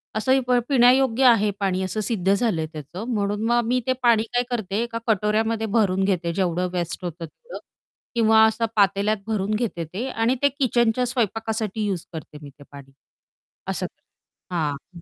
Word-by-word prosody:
असंही 260 Hz, +5 st, +2 dB
प -, -, 0 dB, 0.2 s
पिण्यायोग्य 255 Hz, -1 st, +4 dB
आहे 225 Hz, -4 st, +5 dB
पाणी 190 Hz, -2 st, 0 dB
असं 185 Hz, +3 st, -3 dB
सिद्ध 195 Hz, -5 st, +1 dB
झालंय 200 Hz, -7 st, 0 dB
त्याचं. 155 Hz, +6 st, -7 dB
म्हणून 205 Hz, 0 st, -1 dB
मग 240 Hz, +1 st, +2 dB
मी 250 Hz, +2 st, +2 dB
ते 260 Hz, -, +3 dB
पाणी 230 Hz, -2 st, +4 dB
काय 245 Hz, 0 st, +2 dB
करते 220 Hz, -3 st, -2 dB
एका 235 Hz, -1 st, -4 dB
कटोऱ्यामध्ये 220 Hz, +1 st, +1 dB
भरून 195 Hz, -3 st, +2 dB
घेते 180 Hz, -3 st, 0 dB
जेवढं 180 Hz, -1 st, 0 dB
वेस्ट 175 Hz, 0 st, -3 dB
होतं 170 Hz, 0 st, -5 dB
तेवढं 465 Hz, -, -11 dB, 0.6 s
किंवा 220 Hz, -1 st, +5 dB
असं 220 Hz, +1 st, +1 dB
पातेल्यात 200 Hz, +1 st, +2 dB
भरून 210 Hz, -2 st, -1 dB
घेते 210 Hz, -7 st, -2 dB
ते 230 Hz, +8 st, -3 dB
आणि 230 Hz, +1 st, +1 dB
ते 285 Hz, -, +4 dB
किचनच्या 250 Hz, -3 st, +1 dB
स्वयंपाकासाठी 225 Hz, -3 st, -2 dB
यूज 190 Hz, -5 st, -3 dB
करते 155 Hz, -2 st, -8 dB
मी 145 Hz, -, -10 dB
ते 145 Hz, +1 st, -17 dB
पाणी, 140 Hz, -1 st, -12 dB, 0.8 s
असं -, -, -2 dB
करते -, -, -12 dB, 0.5 s
हां. 160 Hz, +2 st, -4 dB
215 Hz, 170 wpm, -23 LUFS, 185-235 Hz, 0.8 s, आहे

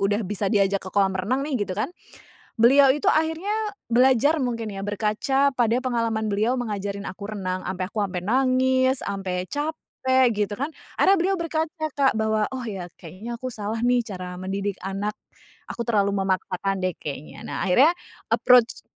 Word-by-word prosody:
udah 205 Hz, +2 st, +1 dB
bisa 200 Hz, +1 st, -1 dB
diajak 200 Hz, -2 st, +2 dB
ke 190 Hz, -, -8 dB
kolam 195 Hz, -1 st, +3 dB
renang 215 Hz, +9 st, -1 dB
nih 270 Hz, -7 st, -2 dB
gitu 185 Hz, -, -4 dB
kan. 215 Hz, -, -1 dB, 0.7 s
Beliau 270 Hz, +4 st, +7 dB
itu 285 Hz, +1 st, 0 dB
akhirnya 320 Hz, +5 st, 0 dB, 0.4 s
belajar 265 Hz, +5 st, +4 dB
mungkin 230 Hz, -4 st, -2 dB
ya 195 Hz, -, -5 dB
berkaca 215 Hz, +7 st, +1 dB
pada 235 Hz, -2 st, +2 dB
pengalaman 230 Hz, -3 st, 0 dB
beliau 220 Hz, +6 st, +1 dB
mengajarin 205 Hz, -3 st, -3 dB
aku 200 Hz, +3 st, -6 dB
renang, 185 Hz, -1 st, -3 dB
sampe 185 Hz, 0 st, -3 dB
aku 210 Hz, +2 st, -4 dB
sampe 185 Hz, -3 st, -2 dB
nangis, 260 Hz, +2 st, +3 dB
sampe 185 Hz, -2 st, -3 dB
capek 260 Hz, -, 0 dB
gitu 205 Hz, 0 st, -1 dB
kan. 285 Hz, +5 st, -3 dB, 0.3 s
Ada 390 Hz, -, +5 dB
beliau 385 Hz, +2 st, +1 dB
berkaca, 320 Hz, -1 st, -2 dB
Kak, 270 Hz, -4 st, +2 dB
bahwa, 220 Hz, -1 st, +1 dB
"Oh 260 Hz, -1 st, -5 dB
ya, 190 Hz, -5 st, -5 dB
kayaknya 195 Hz, +8 st, -7 dB
aku 255 Hz, +1 st, -5 dB
salah 215 Hz, +1 st, -3 dB
nih 245 Hz, 0 st, +3 dB
cara 185 Hz, -5 st, -7 dB
mendidik 195 Hz, +1 st, -3 dB
anak, 195 Hz, +2 st, -3 dB, 0.6 s
aku 235 Hz, -, -3 dB
terlalu 200 Hz, -3 st, +2 dB
memaksakan 190 Hz, 0 st, -1 dB
deh 185 Hz, -2 st, 0 dB
kayaknya." 145 Hz, 0 st, -7 dB
Nah -, -, -4 dB
akhirnya 265 Hz, -, +5 dB, 0.4 s
approach 240 Hz, 0 st, +4 dB
220 Hz, 165 wpm, -24 LUFS, 195-260 Hz, 0.7 s, Beliau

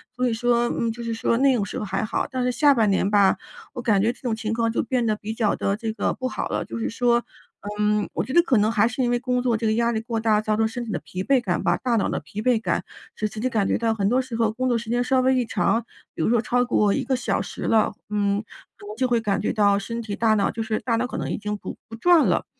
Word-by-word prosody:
所 250 Hz, 0 st, 0 dB
以 230 Hz, -, 0 dB
说， 240 Hz, +1 st, +2 dB
嗯， 230 Hz, -1 st, -1 dB
就 235 Hz, +1 st, -8 dB
是 230 Hz, -1 st, -2 dB
说 230 Hz, +1 st, 0 dB
那 270 Hz, -1 st, +4 dB
种 205 Hz, -, 0 dB
时 -, -, -5 dB
候 210 Hz, -, -3 dB
还 195 Hz, +2 st, -2 dB
好， 215 Hz, -, -1 dB
但 260 Hz, -3 st, -2 dB
是 250 Hz, -, +1 dB
下 285 Hz, +2 st, +4 dB
半 220 Hz, -5 st, +2 dB
年 195 Hz, +1 st, +1 dB
吧， 200 Hz, -2 st, +4 dB, 0.4 s
我 245 Hz, -, -5 dB
感 210 Hz, -5 st, +2 dB
觉 225 Hz, -, +2 dB
这 -, -, -15 dB
种 240 Hz, -4 st, -1 dB
情 220 Hz, 0 st, -3 dB
况 230 Hz, 0 st, +1 dB
就 -, -, 0 dB
变 245 Hz, -1 st, 0 dB
得 215 Hz, -, +1 dB
比 215 Hz, +1 st, -6 dB
较 225 Hz, -3 st, +1 dB
地 195 Hz, -, -1 dB
这 225 Hz, -1 st, -3 dB
个 -, -, -1 dB
不 255 Hz, -, -3 dB
好 -, -, -4 dB
了， -, -, -2 dB
就 -, -, -6 dB
是 225 Hz, -, -2 dB
说， 240 Hz, +1 st, +2 dB, 0.6 s
嗯， 210 Hz, 0 st, +1 dB
我 -, -, -1 dB
觉 260 Hz, -, -6 dB
得 345 Hz, -, +7 dB
可 265 Hz, -8 st, +2 dB
能 210 Hz, +1 st, +3 dB
还 220 Hz, -1 st, +3 dB
是 240 Hz, +3 st, -3 dB
因 240 Hz, -, +1 dB
为 240 Hz, -, +2 dB
工 250 Hz, 0 st, 0 dB
作 245 Hz, -2 st, +1 dB
这 225 Hz, -, -3 dB
个 220 Hz, -, +2 dB
压 235 Hz, +1 st, +1 dB
力 220 Hz, -, -1 dB
过 230 Hz, -1 st, -3 dB
大， 215 Hz, -1 st, +2 dB
造 215 Hz, 0 st, 0 dB
成 220 Hz, 0 st, +2 dB
身 245 Hz, +1 st, -5 dB
体 220 Hz, -, -6 dB
的 175 Hz, -, -2 dB
疲 185 Hz, +1 st, -6 dB
惫 265 Hz, 0 st, +3 dB
感 175 Hz, -5 st, -1 dB
吧、 175 Hz, -2 st, +2 dB
大 245 Hz, -2 st, 0 dB
脑 210 Hz, -, +1 dB
的 -, -, -2 dB
疲 210 Hz, -, -7 dB
惫 245 Hz, -1 st, +2 dB
感， -, -, -1 dB, 0.3 s
使 215 Hz, -, -1 dB
自 215 Hz, -, -8 dB
己 255 Hz, +3 st, 0 dB
感 215 Hz, -4 st, +1 dB
觉 -, -, +1 dB
到 230 Hz, -1 st, +1 dB
很 205 Hz, -2 st, 0 dB
多 255 Hz, +2 st, +2 dB
时 250 Hz, -3 st, -7 dB
候 225 Hz, -2 st, +1 dB
工 255 Hz, +3 st, -2 dB
作 240 Hz, -2 st, +2 dB
时 230 Hz, 0 st, -7 dB
间 245 Hz, +1 st, +1 dB
稍 260 Hz, +1 st, +2 dB
微 260 Hz, 0 st, +3 dB
一 250 Hz, -2 st, +1 dB
长， 230 Hz, +1 st, 0 dB, 0.3 s
比 -, -, -5 dB
如 -, -, +2 dB
说 235 Hz, -1 st, +3 dB
超 245 Hz, +1 st, +1 dB
过 210 Hz, -4 st, +2 dB
1 275 Hz, -, -1 dB
个 265 Hz, -, +1 dB
小 255 Hz, -, -1 dB
时 -, -, -8 dB
了， 220 Hz, -1 st, +2 dB, 0.2 s
嗯， 205 Hz, 0 st, 0 dB, 0.3 s
可 -, -, -13 dB
能 210 Hz, -, -7 dB
就 255 Hz, +1 st, +1 dB
会 240 Hz, -2 st, +1 dB
感 200 Hz, -3 st, 0 dB
觉 -, -, -1 dB
到 200 Hz, -1 st, +3 dB
身 230 Hz, +3 st, -5 dB
体、 210 Hz, -3 st, -5 dB
大 225 Hz, -1 st, +3 dB
脑 200 Hz, -, +1 dB
就 225 Hz, -, -5 dB
是 220 Hz, -1 st, -1 dB
大 235 Hz, -3 st, 0 dB
脑 245 Hz, -, -1 dB
可 -, -, -6 dB
能 -, -, -3 dB
已 -, -, -2 dB
经 210 Hz, 0 st, -3 dB
不 -, -, -8 dB
不 225 Hz, -, -7 dB
转 340 Hz, +7 st, +4 dB
了， -, -, +1 dB
230 Hz, 330 characters per minute, -23 LUFS, 215-245 Hz, 0.6 s, 得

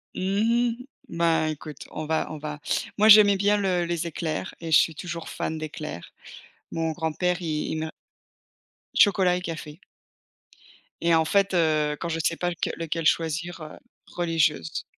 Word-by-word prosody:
Mmh 225 Hz, +6 st, +1 dB
mh. -, -, -12 dB, 0.2 s
Ben, 165 Hz, -1 st, +1 dB
écoute, 155 Hz, -1 st, -7 dB
on 155 Hz, -, -5 dB
va 160 Hz, +1 st, 0 dB
on 155 Hz, -, -5 dB
va 150 Hz, 0 st, -6 dB, 0.4 s
moi, 215 Hz, +1 st, +5 dB
j'aimais 205 Hz, -1 st, +9 dB
bien 205 Hz, +2 st, +3 dB
le 185 Hz, -3 st, +1 dB
les 170 Hz, 0 st, -2 dB
éclairs 160 Hz, -1 st, -4 dB
et 165 Hz, -1 st, -5 dB
je 155 Hz, -, +8 dB
suis 160 Hz, -, +1 dB
toujours 170 Hz, +1 st, -6 dB
fan 160 Hz, -, -3 dB
d'éclairs. 155 Hz, -, -7 dB, 0.6 s
Mon 165 Hz, -1 st, -1 dB
grand-père, 175 Hz, +3 st, -1 dB
i 155 Hz, -2 st, -2 dB
il -, -, -2 dB
m'a 160 Hz, 0 st, -4 dB, 1.0 s
Chocolat 185 Hz, -3 st, +4 dB
et -, -, -5 dB
café. 160 Hz, -3 st, -7 dB, 1.2 s
Et 170 Hz, 0 st, +3 dB
en 160 Hz, 0 st, +3 dB
fait, 195 Hz, +3 st, +2 dB
heu, 155 Hz, -3 st, +2 dB
quand 170 Hz, -, -3 dB
je 165 Hz, 0 st, -2 dB
sais 165 Hz, -, 0 dB
pas 175 Hz, -, -1 dB
leque 170 Hz, -, -3 dB
lequel 165 Hz, 0 st, -3 dB
choisir, 170 Hz, +2 st, -1 dB
heu, 155 Hz, 0 st, -9 dB, 0.3 s
religieuse. 165 Hz, -, -1 dB
165 Hz, 165 wpm, -25 LUFS, 155-180 Hz, 1.2 s, j'aimais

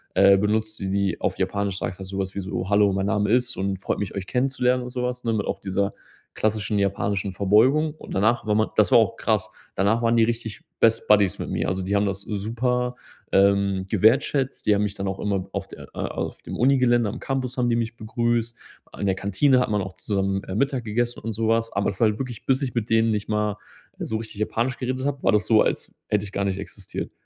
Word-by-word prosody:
äh, 100 Hz, 0 st, +6 dB
benutzt, 110 Hz, +2 st, 0 dB
die 95 Hz, -, -3 dB
die 100 Hz, -2 st, 0 dB
auf -, -, -1 dB
Japanisch 100 Hz, -2 st, -1 dB
sagst 90 Hz, -, -4 dB
du -, -, -8 dB
halt 95 Hz, -, -7 dB
sowas 95 Hz, -1 st, -3 dB
wie 100 Hz, -, -2 dB
so: 95 Hz, -1 st, -4 dB
„Hallo, 100 Hz, 0 st, +4 dB
mein 95 Hz, 0 st, 0 dB
Name 105 Hz, -1 st, +1 dB
ist 125 Hz, +2 st, +2 dB
und 95 Hz, 0 st, -1 dB
freut -, -, -2 dB
mich, 105 Hz, -, -4 dB
euch 100 Hz, -2 st, -4 dB
kennenzulernen“ 125 Hz, -1 st, +1 dB
und 125 Hz, -, -6 dB
sowas, 125 Hz, 0 st, -3 dB
ne? 115 Hz, -, +1 dB
Mit 105 Hz, -2 st, -1 dB
auch -, -, -2 dB
dieser 100 Hz, +1 st, -1 dB, 0.4 s
klassischen 110 Hz, -1 st, 0 dB
japanischen 100 Hz, 0 st, -1 dB
Verbeugung. 125 Hz, -, +3 dB
Und -, -, -10 dB
danach 110 Hz, +5 st, +2 dB
war 105 Hz, -, +2 dB
man 110 Hz, +1 st, +2 dB
das -, -, +4 dB
war -, -, +8 dB
auch -, -, +1 dB
krass. -, -, 0 dB, 0.2 s
Danach 105 Hz, +4 st, +2 dB
waren 115 Hz, 0 st, +2 dB
die 115 Hz, -, +5 dB
richtig 115 Hz, -2 st, -4 dB, 0.2 s
best 115 Hz, 0 st, +3 dB
Buddies 100 Hz, -2 st, +4 dB
mit -, -, -4 dB
mir. -, -, -1 dB
Also 95 Hz, 0 st, -2 dB
die 100 Hz, +2 st, -1 dB
haben 100 Hz, 0 st, +2 dB
das 100 Hz, 0 st, -2 dB
super, 125 Hz, +5 st, -1 dB, 0.4 s
ähm, 100 Hz, -1 st, +3 dB
wertgeschätzt. 130 Hz, +6 st, +2 dB
Die 105 Hz, -, +5 dB
haben 100 Hz, -, +1 dB
mich 105 Hz, -1 st, -2 dB
dann 100 Hz, -1 st, -3 dB
auch 95 Hz, 0 st, -3 dB
immer 100 Hz, -2 st, -1 dB
auf -, -, -3 dB
der -, -, -12 dB
äh, -, -, -9 dB
auf -, -, -4 dB
dem -, -, -6 dB
Uni-Gelände 125 Hz, -2 st, +3 dB
am -, -, -6 dB
Campus 130 Hz, -1 st, -3 dB
haben 125 Hz, -1 st, +1 dB
die 115 Hz, -, +2 dB
mich 115 Hz, 0 st, -2 dB
begrüßt. 115 Hz, +1 st, -1 dB, 0.4 s
In -, -, -1 dB
der 95 Hz, -, +3 dB
Kantine 115 Hz, +8 st, +2 dB
hat 125 Hz, -, 0 dB
man 105 Hz, -1 st, +1 dB
auch 95 Hz, 0 st, -7 dB
zusammen, 95 Hz, 0 st, -1 dB
äh, 95 Hz, -, -5 dB
Mittag 135 Hz, +1 st, 0 dB
gegessen 120 Hz, +3 st, -1 dB
und 115 Hz, 0 st, -4 dB
sowas. 115 Hz, +1 st, 0 dB
Aber 100 Hz, -, +1 dB
es 95 Hz, -, -11 dB
war 115 Hz, -, +5 dB
halt 105 Hz, -, -3 dB
wirklich, 125 Hz, -4 st, -6 dB
bis 135 Hz, +1 st, +2 dB
ich 130 Hz, -, -3 dB
mit 115 Hz, -2 st, -1 dB
denen 115 Hz, 0 st, +3 dB
nicht 105 Hz, -1 st, -2 dB
mal 105 Hz, -1 st, 0 dB, 0.4 s
so 110 Hz, -, -2 dB
richtig 110 Hz, -2 st, -8 dB
Japanisch 115 Hz, +3 st, -1 dB
geredet 130 Hz, +1 st, -2 dB
habe, 140 Hz, -1 st, -2 dB
war -, -, +4 dB
das 105 Hz, -1 st, +2 dB
so, 110 Hz, -2 st, +5 dB
als -, -, -1 dB
hätte 105 Hz, -1 st, 0 dB
ich 100 Hz, -, -9 dB
gar 100 Hz, 0 st, -1 dB
nicht 95 Hz, -1 st, -1 dB
existiert. 100 Hz, -1 st, -6 dB
105 Hz, 240 wpm, -24 LUFS, 100-120 Hz, 0.4 s, war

